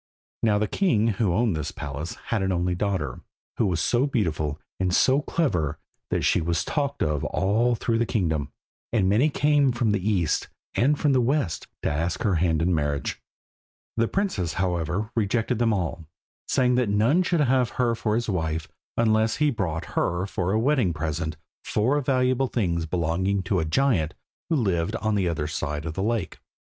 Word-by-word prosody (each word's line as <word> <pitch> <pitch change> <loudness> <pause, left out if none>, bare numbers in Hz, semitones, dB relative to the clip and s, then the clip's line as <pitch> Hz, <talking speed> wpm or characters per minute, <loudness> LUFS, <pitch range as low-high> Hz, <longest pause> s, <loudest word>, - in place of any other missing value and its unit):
Now 105 -2 +3
the 105 +1 +1
king 115 - +2
who 100 -5 +3
owned 110 0 +1
this 75 -2 -3
palace 75 +3 -5
had 110 -3 +1
an 95 0 0
only 90 0 0
daughter, 90 -9 -2 0.4
who 110 - +2
was 90 -3 0
so 120 - +2
beautiful 80 - -1 0.2
and 95 -1 +1
so 130 +9 +4
clever 85 - 0 0.3
that - - 0
she - - +3
was 85 +1 0
talked 140 -2 -1
of 75 -2 0
all 115 +6 +1
through 115 0 0
the 115 - +1
kingdom, 80 -9 0 0.4
and 105 -5 +2
many 110 +10 +3
came 145 -2 +3
from 120 -2 +1
the 100 -2 0
east 90 -7 +1 0.3
and 145 +5 +2
from 145 -3 +3
the 130 - +4
west 125 - 0 0.2
to - - +1
ask 80 +3 -1
her 100 - +2
hand 80 -2 +1
in 90 +2 +2
marriage. 75 -2 -1 0.7
The 115 0 +2
princess, 175 - -1
however, 90 +4 -1
rejected 115 +2 0
them 115 -1 +3
all, 85 -5 -2 0.4
saying 125 -1 +2
that 120 - 0
none 115 - +3
should 175 -3 +1
have 130 -3 +3
her 120 -2 +2
for 110 -1 -1
his 120 +1 -1
wife 80 -5 -2 0.3
unless 110 -1 +3
he 150 -1 +2
brought 85 - -3
her 85 +2 0
for 95 -2 -2
a 110 - +2
wedding 120 - +2
present 80 +1 -3 0.3
four 130 +8 +1
valuable 130 0 +2
things 85 -9 -1
belonging 90 +4 0
to 95 0 0
a 80 - 0
giant 85 - +1 0.3
who 165 - +2
lived 95 - 0
on 110 -1 -1
the 100 -3 +1
other 80 -3 -1
side 75 0 -3
of 80 - -3
the 95 - -3
lake. 110 -2 -1
100 Hz, 185 wpm, -25 LUFS, 85-120 Hz, 0.7 s, so